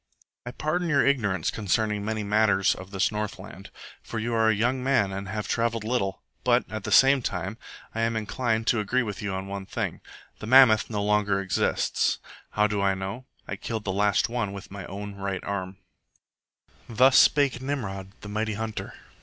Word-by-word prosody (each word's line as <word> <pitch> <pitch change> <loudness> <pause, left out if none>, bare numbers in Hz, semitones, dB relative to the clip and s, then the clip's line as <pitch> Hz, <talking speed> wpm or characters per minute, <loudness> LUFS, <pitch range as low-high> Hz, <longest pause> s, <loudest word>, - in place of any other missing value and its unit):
"I - - -3
pardon 165 +6 -1
your 145 -3 +3
ignorance 100 - +1
concerning 105 0 0
many 110 0 -2
matters 105 -2 +3
of 95 - -10
this 95 0 0
Northland, 105 -2 -6 0.3
for 115 - -7
you 115 +2 -2
are 110 -1 +3
a 110 - +3
young 125 +4 0
man 130 -7 +2
and 95 0 -5
have 105 +2 -4
travelled 115 -1 0
little; 110 -4 -2 0.2
but, - - +3
at - - -5
the - - -3
same 135 0 +6
time, - - -4 0.3
I 115 - -2
am 115 0 +1
inclined 110 +1 -1
to 120 - +2
agree 125 +5 +1
with 105 -4 -5
you 100 -1 -3
on 95 0 -4
one 100 0 -6
thing. - - -3 0.4
The 105 - -7
mammoth 125 -3 +6
no 105 -2 -2
longer 105 -1 +2
exists. 95 -2 0 0.4
How 105 - +3
do 105 -1 0
I 100 -1 +2
know? 95 +7 -6 0.2
I - - -3
killed 110 -3 -4
the 95 - -2
last 100 +1 +2
one 115 -4 -2
with 100 -1 -9
my 95 -2 -7
own 100 +1 -6
right 100 -1 -4
arm." 95 -1 -4 1.1
Thus 130 +3 +5
spake 140 -4 +4
Nimrod, 105 -9 -4
the - - -9
mighty 110 +1 -1
Hunter. 110 0 -5
105 Hz, 185 wpm, -26 LUFS, 100-115 Hz, 1.1 s, same